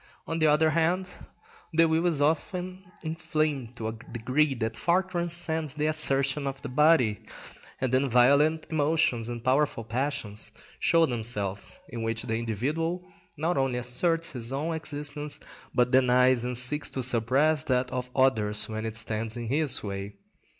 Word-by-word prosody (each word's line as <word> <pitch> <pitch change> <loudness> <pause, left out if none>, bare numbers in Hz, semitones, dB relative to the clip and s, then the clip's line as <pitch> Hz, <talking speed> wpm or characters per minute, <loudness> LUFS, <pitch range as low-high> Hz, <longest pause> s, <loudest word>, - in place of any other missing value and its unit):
On 165 0 -3
the 155 - +4
other 155 +1 +4
hand, 170 +3 +1 0.6
the 165 0 +4
will 160 +2 +1
is 155 -5 0
often 180 +4 -2
inflamed 155 -6 -2
to 110 - -4
a - - -2
degree 125 +6 -1
that 110 -2 -3
far 175 +2 +2
transcends 170 -4 -1
the 150 0 -1
assertion 140 -2 +3
of 135 0 -4
the 140 - -5
body, 130 -6 +3 0.6
and 130 -1 -1
then 135 +1 +2
violent 140 +6 +4
emotions 145 -7 +1
and 120 -1 -6
powerful 130 -2 +1
passions 115 -3 -3 0.3
show 165 0 +4
themselves, 110 -6 -3
in 115 -1 -6
which 115 0 -2
the 115 -2 -2
individual 150 - -2 0.3
not 160 0 0
only 135 -2 0
asserts 165 +7 0
his 120 -2 -4
own 150 +5 -2
existence, 150 -1 -5 0.4
but 125 0 +2
denies 125 -1 +4
and 125 0 -2
seeks 135 +4 +1
to 130 - -4
suppress 130 +6 +2
that 125 -1 0
of 125 -1 -4
others 110 -6 +2
when 110 0 -4
it 110 - -5
stands 110 0 -1
in 120 -2 -5
his 145 0 +1
way. 100 0 -5
135 Hz, 155 wpm, -27 LUFS, 120-155 Hz, 0.6 s, the